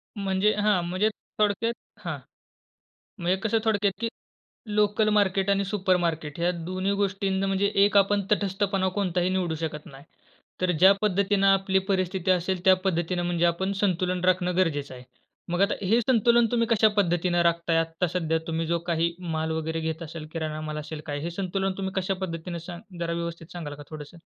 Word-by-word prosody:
म्हणजे 200 Hz, +1 st, +1 dB
हां, 210 Hz, -3 st, +2 dB
म्हणजे 185 Hz, +5 st, +1 dB, 0.3 s
थोडक्यात 215 Hz, +3 st, +1 dB, 0.3 s
हां, -, -, -3 dB, 1.0 s
मग 170 Hz, -, -4 dB
हे 185 Hz, -, +4 dB
कसं 220 Hz, 0 st, +2 dB
थोडक्यात, 205 Hz, -2 st, +2 dB
की 230 Hz, -, +1 dB, 0.7 s
लोकलमार्केट 205 Hz, -2 st, +2 dB
आणि 200 Hz, 0 st, +2 dB
सुपरमार्केट 175 Hz, -6 st, 0 dB
ह्या 175 Hz, +1 st, +2 dB
दोन्ही 185 Hz, +2 st, -1 dB
गोष्टींना 195 Hz, 0 st, 0 dB
म्हणजे 195 Hz, +1 st, +1 dB, 0.2 s
एक 205 Hz, 0 st, +2 dB
आपण 200 Hz, +1 st, +4 dB
तटस्थपणा 195 Hz, -1 st, +1 dB
कोणताही 180 Hz, -3 st, 0 dB
निवडू 185 Hz, -3 st, 0 dB
शकत 155 Hz, -1 st, -5 dB
नाही. 135 Hz, 0 st, -13 dB, 0.6 s
तर 180 Hz, -1 st, +2 dB
ज्या 190 Hz, +2 st, +8 dB
पद्धतीनं 200 Hz, -1 st, +2 dB
आपली 195 Hz, 0 st, +3 dB
परिस्थिती 185 Hz, -1 st, +1 dB
असेल 180 Hz, 0 st, 0 dB
त्या 190 Hz, 0 st, +7 dB
पद्धतीनं 175 Hz, -1 st, 0 dB
म्हणजे 175 Hz, -1 st, +1 dB
आपण 190 Hz, +3 st, 0 dB
संतुलन 180 Hz, -2 st, 0 dB
राखणं 180 Hz, -1 st, +2 dB
गरजेचं 145 Hz, -7 st, 0 dB
आहे. 125 Hz, -, -11 dB, 0.5 s
मग 175 Hz, +2 st, 0 dB
आता 200 Hz, -, +3 dB
हे 225 Hz, +5 st, +4 dB
संतुलन 235 Hz, 0 st, +4 dB
तुम्ही 230 Hz, -1 st, +2 dB
कशा 220 Hz, -1 st, +4 dB
पद्धतीनं 175 Hz, -2 st, +2 dB
राखत 170 Hz, 0 st, +1 dB
आहेत 165 Hz, 0 st, +4 dB
आत्ता 165 Hz, +2 st, -2 dB
सध्या 165 Hz, -2 st, 0 dB
तुम्ही 165 Hz, 0 st, -1 dB
जो 170 Hz, +1 st, +1 dB
काही 170 Hz, 0 st, +1 dB, 0.2 s
माल 160 Hz, 0 st, -1 dB
वगैरे 160 Hz, 0 st, -2 dB
घेत 160 Hz, +1 st, -3 dB
असेल, 155 Hz, -1 st, -8 dB
किराणा 155 Hz, -1 st, -4 dB
माल 155 Hz, 0 st, -4 dB
असेल 150 Hz, 0 st, -6 dB
काय 145 Hz, -1 st, -3 dB
हे 170 Hz, -, -3 dB
संतुलन 195 Hz, +1 st, -2 dB
तुम्ही 190 Hz, -1 st, -3 dB
कशा 190 Hz, 0 st, 0 dB
पद्धतीने 170 Hz, -1 st, -4 dB
सांग 175 Hz, +2 st, -10 dB
जरा 170 Hz, 0 st, -1 dB
व्यवस्थित 170 Hz, -1 st, -5 dB
सांगाल 160 Hz, -5 st, -6 dB
का 145 Hz, -, -10 dB
थोडंसं? 155 Hz, +2 st, -9 dB
185 Hz, 175 wpm, -26 LUFS, 165-195 Hz, 1.0 s, ज्या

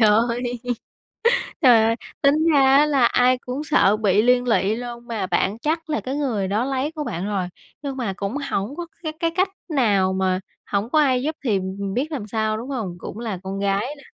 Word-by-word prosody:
ơi, 210 Hz, -1 st, +6 dB, 1.4 s
trời 245 Hz, -6 st, +7 dB
ơi! 225 Hz, +1 st, +2 dB, 0.3 s
Tính 280 Hz, +1 st, +5 dB, 0.2 s
ra 280 Hz, -2 st, +5 dB
á 295 Hz, -, +6 dB
là 280 Hz, -5 st, +3 dB
ai 250 Hz, +1 st, +4 dB
cũng 255 Hz, +3 st, -5 dB
sợ 215 Hz, -9 st, +3 dB
bị 205 Hz, -2 st, +3 dB
liên 250 Hz, +1 st, +3 dB
lụy 215 Hz, -2 st, +2 dB
luôn, 240 Hz, 0 st, -7 dB
mà 215 Hz, -5 st, -2 dB
bạn 195 Hz, +3 st, 0 dB
chắc 320 Hz, +5 st, -2 dB
là 300 Hz, -, 0 dB
cái 260 Hz, +2 st, -4 dB
người 240 Hz, -10 st, -1 dB
đó 210 Hz, +5 st, 0 dB
lấy 270 Hz, +2 st, -1 dB
của 310 Hz, -2 st, -4 dB
bạn 175 Hz, -, -4 dB
rồi, 200 Hz, -3 st, -1 dB, 0.3 s
nhưng 275 Hz, -2 st, -4 dB
mà 230 Hz, -7 st, -2 dB
cũng 200 Hz, +5 st, -3 dB
hổng 205 Hz, +8 st, -2 dB
có 345 Hz, -, -5 dB, 0.2 s
cái 315 Hz, -, -2 dB
cái 330 Hz, -1 st, +1 dB
cách 375 Hz, +2 st, +2 dB, 0.2 s
nào 205 Hz, -10 st, +2 dB
mà 190 Hz, -1 st, +1 dB, 0.3 s
hổng 205 Hz, +3 st, 0 dB
có 310 Hz, -, +3 dB
ai 260 Hz, -4 st, +3 dB
giúp 310 Hz, +2 st, -1 dB
thì, 220 Hz, -7 st, +2 dB
ừm, 190 Hz, 0 st, -4 dB
ừm, 200 Hz, -1 st, -3 dB
biết 280 Hz, +8 st, -1 dB
làm 255 Hz, -9 st, -4 dB
sao, 215 Hz, 0 st, -1 dB
đúng 240 Hz, +5 st, -7 dB
hông? 220 Hz, -10 st, -3 dB
Cũng 210 Hz, -, -7 dB
là 220 Hz, -6 st, -4 dB
con 195 Hz, +1 st, -4 dB
gái 200 Hz, +1 st, +1 dB
nà. 280 Hz, -, -16 dB
235 Hz, 220 wpm, -22 LUFS, 200-275 Hz, 1.4 s, trời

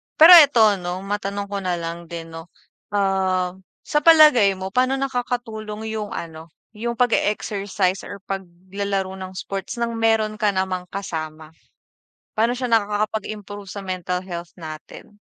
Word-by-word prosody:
Pero 325 Hz, +3 st, +9 dB
eto 225 Hz, -9 st, +5 dB
'no, 180 Hz, +1 st, -5 dB
matanong 200 Hz, 0 st, -3 dB
ko 200 Hz, -, -2 dB
na 180 Hz, -2 st, -1 dB
lang 170 Hz, 0 st, -6 dB
din 165 Hz, -1 st, -8 dB
no 165 Hz, +1 st, -9 dB, 0.5 s
ah, 190 Hz, -2 st, +1 dB, 0.3 s
sa 295 Hz, -, +1 dB
palagay 300 Hz, -11 st, +6 dB
mo 190 Hz, 0 st, -6 dB
paano 255 Hz, +4 st, +2 dB
nakakatulong 245 Hz, -5 st, -4 dB
yung 215 Hz, -2 st, -4 dB
ano, 160 Hz, -1 st, -7 dB, 0.2 s
yung 235 Hz, +2 st, -4 dB
pag-e-exercise 205 Hz, -5 st, 0 dB
or 200 Hz, -1 st, -9 dB
paglalaro 190 Hz, +1 st, -4 dB
ng 185 Hz, 0 st, -8 dB
sports 195 Hz, 0 st, -5 dB
ng 235 Hz, -1 st, -2 dB
meron 220 Hz, -1 st, +1 dB
ka 210 Hz, -1 st, +3 dB
namang 185 Hz, -1 st, -2 dB
kasama? 160 Hz, -5 st, -6 dB, 0.9 s
Paano 225 Hz, +2 st, +2 dB
siya 250 Hz, 0 st, -3 dB
nakakapag-improve 210 Hz, -2 st, -2 dB
sa 200 Hz, -, -6 dB
mental 180 Hz, -1 st, -3 dB
health 175 Hz, -2 st, -7 dB
natin? 160 Hz, +5 st, -10 dB
200 Hz, 135 wpm, -22 LUFS, 185-220 Hz, 0.9 s, Pero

